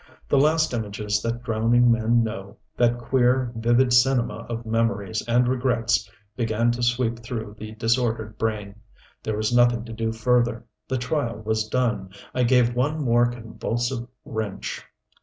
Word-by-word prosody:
The 140 - +3
last 155 +1 +3
images 105 -2 -2
that 115 +2 -3
drowning 120 +1 +3
men 115 +1 +3
know, 105 -2 -6 0.2
that 120 0 +2
queer, 125 0 +1
vivid 120 +2 +3
cinema 125 -1 +2
of 115 0 -4
memories 115 -4 0
and 120 +1 +3
regrets 115 -5 +1 0.3
began 115 +1 +1
to 120 +1 -4
sweep 120 -1 0
through 115 -3 -6
the 110 0 -7
disordered 115 -1 0
brain. 105 -2 -3 0.4
There 110 -1 -3
was 110 +3 0
nothing 120 -1 +3
to 115 - -8
do 115 0 -2
further. 120 0 +1 0.2
The 130 - -1
trial 125 -3 -2
was 110 0 0
done. 115 -6 0 0.2
I 125 - 0
gave 120 -1 +3
one 145 +5 0
more 120 -1 +4
convulsive 120 +1 -3 0.2
wrench.... 110 -4 -4
115 Hz, 150 wpm, -24 LUFS, 110-125 Hz, 0.4 s, more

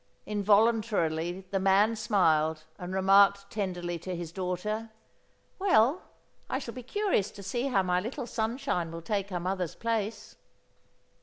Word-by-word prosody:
Involuntarily 205 -5 +2
the 195 - +1
man 195 +4 +4
smiled 160 -8 +2 0.2
and 180 0 -6
remarked 200 +1 +4
tenderly 180 -5 -3
to 180 +2 -5
his 170 -2 -6
daughter: 190 +5 -3 0.7
"Well 315 - +4 0.5
I - - 0
shall 245 -4 -6
be 255 - -7
curious 265 - 0
to 200 -1 -11
see 240 +7 -2
how 200 -8 +2
my 180 -1 +1
little 240 +7 -4
sunshine 225 - -2
will 165 0 -7
take 200 +1 -2
her 180 -2 -3
mother's 180 -1 -2
place." 225 -2 -3
200 Hz, 140 wpm, -29 LUFS, 180-225 Hz, 0.7 s, man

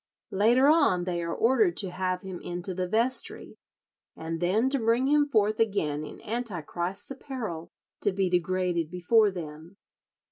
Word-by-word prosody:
Later 235 +7 +4
on 290 - +4
they 175 -1 -2
are 170 0 -3
ordered 265 - +2
to 190 -3 -2
have 185 0 -2
him 190 -2 -6
into 175 +2 -4
the 180 0 -2
vestry, 230 +7 -1 0.6
and 165 0 -5
then 195 +8 +2
to 275 - +1
bring 230 +3 +2
him 290 +1 +3
forth 215 -5 +1
again 165 -10 0
in 150 - -9
Antichrist's 195 - -4
apparel 235 - -6 0.3
to 205 - +2
be 190 0 0
degraded 180 -2 0
before 205 +5 +3
them. 165 0 -9
190 Hz, 150 wpm, -27 LUFS, 175-230 Hz, 0.6 s, Later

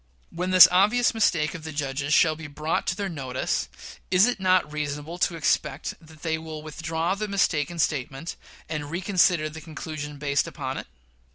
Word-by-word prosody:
When 180 +2 -3
this 185 -1 +10
obvious 210 +8 +4
mistake 175 -8 +1
of 170 -4 -8
the 160 - -6
judges 140 -1 -3
shall 155 +1 +5
be 160 0 -8
brought 155 +2 -2
to 175 - +1
their 200 0 -3
notice, 135 -7 -2 0.4
is 185 +2 +5
it 245 -3 -1
not 185 -4 +2
reasonable 150 +3 -4
to 170 - +1
expect 145 -2 0
that 160 -1 -17
they 160 -1 -1
will 160 -1 -8
withdraw 160 +3 -2
the 210 +2 -3
mistaken 170 -5 0
statement, 145 0 -2 0.3
and 150 -2 -4
reconsider 175 -2 +2
the 155 +1 -9
conclusion 155 -2 -7
based 140 -1 0
upon - - -4
it? - - -9
160 Hz, 175 wpm, -25 LUFS, 150-180 Hz, 0.4 s, this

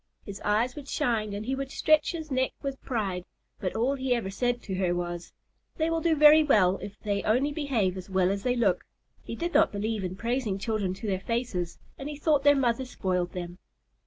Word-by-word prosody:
His 200 0 -8
eyes 220 +4 +1
would 290 -2 -8
shine 230 -8 0
and 205 +1 -4
he 260 - -1
would 270 0 -3
stretch 310 +2 +3
his 320 -3 -6
neck 260 0 +1
with 275 -1 -4
pride, 200 -8 -2 0.4
but 185 - -3
all 240 +5 +2
he 260 -2 0
ever 215 -5 -3
said 245 +4 0
to 195 - -5
her 185 -2 +1
was, 175 0 -4 0.5
"They 320 +1 +1
will 330 0 0
do 330 -1 +3
very 300 +1 +8
well 195 -10 +4
if 205 +1 -8
they 200 -2 -1
only 255 +7 +2
behave 260 - 0
as 185 0 -8
well 190 -1 +2
as 200 0 -2
they 250 +3 +1
look." 200 -7 +2 0.4
He - - -6
did 345 +1 -3
not - - +5
believe 210 0 -2
in 185 0 -3
praising 230 -1 -1
children 200 -3 -1
to 195 - -8
their 190 -3 0
faces, 200 -6 -2 0.2
and 280 +2 -5
he 300 - -5
thought 295 -2 +2
their 285 0 +6
mother 255 -2 +1
spoiled 180 -7 -2
them. 175 0 -6
225 Hz, 220 wpm, -28 LUFS, 190-270 Hz, 0.5 s, very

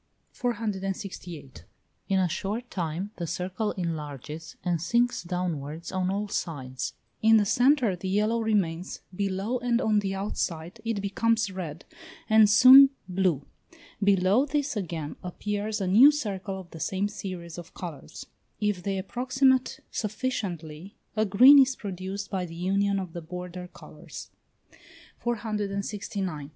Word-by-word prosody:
468. 195 - -4 0.4
In 195 - +3
a 185 -1 +3
short 205 +8 -4
time 175 +3 -3
the 170 - -3
circle 185 +5 -2
enlarges 155 -2 -5
and 175 -3 0
sinks 240 +7 +1
downwards 170 -3 -4
on 185 -1 0
all 205 +2 -1
sides; 130 -10 -4 0.3
in 225 0 +6
the 210 - +3
centre 245 -2 +3
the 185 +2 -5
yellow 215 +4 +1
remains; 190 -6 -1
below 200 +5 -1
and 240 -1 +1
on 215 -4 +2
the 195 -1 -2
outside 190 0 -3
it 225 -3 -2
becomes 220 +1 +1
red, 170 -4 -6 0.4
and 220 -1 +6
soon 260 +5 +9 0.2
blue; 180 -6 0 0.6
below 200 +4 +4
this 290 -2 -1
again 165 -7 -4
appears 210 +4 -3
a 195 - -1
new 220 +10 +8
circle 200 -8 -4
of 180 -2 -12
the 165 - -9
same 190 +5 0
series 180 -5 -7
of 170 - -12
colours: 165 -7 -8 0.3
if 210 -3 0
they 195 +1 -2
approximate 255 +5 +1
sufficiently, 195 -7 -4 0.2
a 215 0 +2
green 255 +9 +8
is 265 -1 +4
produced 195 0 -5
by 190 -2 -1
the 165 -2 -7
union 195 +3 +1
of 185 -4 -4
the 170 - -5
border 180 +2 -7
colours. - - -11 0.9
469. 200 -7 -3
195 Hz, 135 wpm, -27 LUFS, 175-220 Hz, 0.9 s, soon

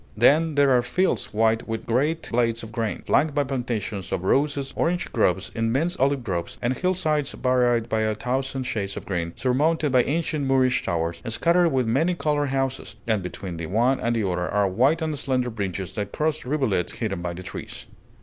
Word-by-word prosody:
Then 150 +7 +4
there 140 -1 +4
are 125 -1 +5
fields 185 +10 0
white 110 +1 +1
with 115 -1 -4
great 150 +8 0
blades 115 -1 +1
of 110 - -8
grain, 115 -2 -3
flanked 150 -1 +2
by 145 - +3
plantations 120 -7 -3
of 90 - -2
roses, 140 +5 +1
orange 175 +1 -1
groves, 95 -5 +1
immense 130 +10 0
olive 135 -1 +1
groves, 90 -6 -3
and 125 +2 0
hillsides 155 -5 0
varied 125 -2 +2
by 110 -2 0
a 110 0 0
thousand 130 +3 -2
shades 105 -6 -3
of - - -6
green, 85 -3 -2
surmounted 150 +4 +1
by 125 -1 +5
ancient 150 0 -1
Moorish 130 -1 +3
towers, 85 -1 -2
scattered 170 +9 +3
with 130 -4 +1
many 155 +11 +1
colored 145 -2 0
houses; 135 -1 -2
and 110 -4 +1
between 90 -1 -6
the 80 -1 -4
one 120 +8 +2
and 120 0 0
the 110 -4 0
other 90 -1 -1
are 105 -1 +2
white 130 - +2
and 155 -3 -2
slender 130 -3 0
bridges 95 -4 -4
that 100 -2 -4
cross 155 -3 -1
rivulets 125 - 0
hidden 100 -6 -3
by 85 0 -3
the 90 +2 -8
trees. - - -8
125 Hz, 190 wpm, -24 LUFS, 105-145 Hz, -, are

